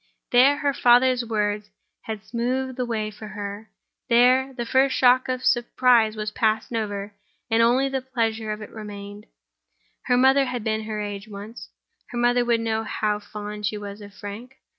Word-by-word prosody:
There, 265 +4 +6
her 285 -1 0
father's 250 0 +4
words 210 -2 -2 0.4
had 220 -2 -5
smoothed 255 +3 -2
the 250 -1 -2
way 215 -2 -2
for 215 +1 -10
her; 205 +1 -7 0.4
there, 255 +3 +4
the 245 -2 -5
first 260 +2 +2
shock 255 0 +4
of 255 0 -1
the - - -7
surprise 240 -3 +3
was 215 -1 -4
past 220 +1 0
and 230 - 0
over, 205 -1 -4 0.4
and 225 +1 +4
only 250 +4 +3
the 265 -1 -2
pleasure 225 -4 -2
of 210 0 -5
it - - -11
remained. 205 -1 -9 0.8
Her 245 - +3
mother 265 +2 +5
had 250 -3 -4
been 220 0 -1
her 215 -1 -4
age 205 0 -5
once; 210 +2 -9 0.4
her 240 - -6
mother 245 0 +3
would 235 -1 +1
know 225 -1 -1
how 210 -1 -1
fond 210 0 -6
she 215 - -3
was 205 0 -8
of 205 0 -11
Frank. 205 +6 -9
225 Hz, 185 wpm, -24 LUFS, 210-250 Hz, 0.8 s, There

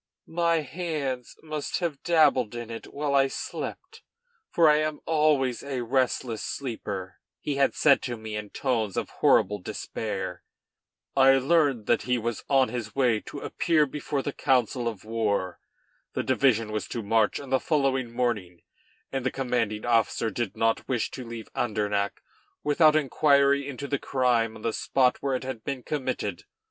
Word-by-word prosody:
"My 170 -1 +1
hands 150 -5 -4
must 155 -2 -3
have 165 -6 -3
dabbled 150 -9 +3
in 120 -1 -6
it 115 - -8
while 145 0 -2
I 135 -1 +5
slept, - - -6 0.5
for 165 -2 +4
I 150 0 +6
am 155 0 -1
always 150 -6 +2
a 135 -3 -3
restless 125 -2 0
sleeper," 100 -8 -5 0.2
he 145 -2 -3
had 140 - +2
said 140 -3 +5
to 120 -2 -4
me 110 -1 -6
in 105 -1 -5
tones 115 -7 -1
of - - -2
horrible 105 +2 +4
despair. 95 -2 -5 0.7
I 135 0 +6
learned 135 -5 +2
that 120 - +2
he 125 0 0
was 120 -1 -3
on 135 -2 +4
his 120 -4 -5
way 125 -5 +3
to 140 - -9
appear 160 -3 +2
before 140 0 -3
the 145 - -3
council 125 -2 +1
of 110 -3 -5
war. 105 -5 -1 0.5
The - - -1
division 115 -5 +2
was 105 0 -3
to 115 - -4
march 110 +1 +2
on 140 -2 -9
the 130 - +4
following 135 -5 0
morning, 110 -8 -2 0.5
and 135 -1 -2
the 130 - +1
commanding 120 -6 -1
officer 115 -1 +1
did 120 -5 -3
not 115 0 +1
wish 120 -4 -1
to 130 - -6
leave 115 -1 -7
Andernach 105 -3 -1 0.4
without 155 +1 +5
inquiry 140 -1 +3
into 140 0 -5
the 140 -1 -1
crime 120 -4 +1
on - - -12
the 115 - 0
spot 125 +2 +2
where 135 -1 0
it 130 - -3
had 130 -4 -6
been 135 -3 -4
committed. 145 -1 -3
130 Hz, 165 wpm, -27 LUFS, 115-140 Hz, 0.7 s, I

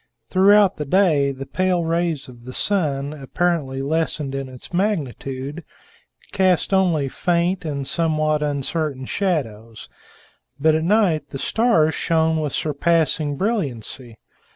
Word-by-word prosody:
Throughout 200 +1 +5
the 150 - -3
day 150 -4 +3
the 135 0 -7
pale 185 +2 0
rays 165 -2 -1
of 120 -2 -14
the 130 - -8
sun, 145 -8 -1
apparently 145 -2 -1
lessened 150 -2 -1
in 135 -1 -4
its 130 +6 -11
magnitude, 150 - -2 0.7
cast 190 -1 +2
only 175 -7 +2
faint 175 +5 0
and 140 -3 -3
somewhat 155 -1 0
uncertain 145 -1 -2
shadows; 115 - -3 0.7
but 155 +2 +4
at 160 0 +1
night 185 -4 +2
the 135 - -6
stars 165 - +2
shone 160 -1 +1
with 150 -2 -2
surpassing 155 0 0
brilliancy. 135 - -3
155 Hz, 125 wpm, -21 LUFS, 135-175 Hz, 0.7 s, Throughout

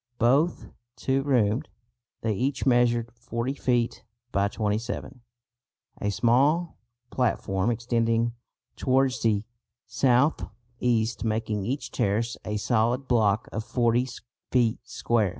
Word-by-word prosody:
Both 140 +9 +2 0.3
two 135 0 0
roomed, 125 -1 +1 0.5
they 110 -1 0
each 130 +6 -1
measured 120 -2 +3
40 120 +2 -3
feet 120 -4 0 0.3
by 100 +1 +2
27, 110 +5 -3 0.8
a 105 - 0
small 140 - +2 0.3
platform 105 -5 0
extending 115 0 +1 0.4
towards 130 -1 +1
the 105 -2 +2 0.4
south 130 +3 +2 0.4
east 115 -2 +1
making 110 -2 -1
each 135 +6 -3
terrace 115 +4 0
a 105 0 -2
solid 120 +4 +1
block 110 -4 +2
of 110 - -2
40 120 +1 +1 0.4
feet 120 -3 +2
square. 110 -4 0
120 Hz, 110 wpm, -26 LUFS, 110-130 Hz, 0.8 s, measured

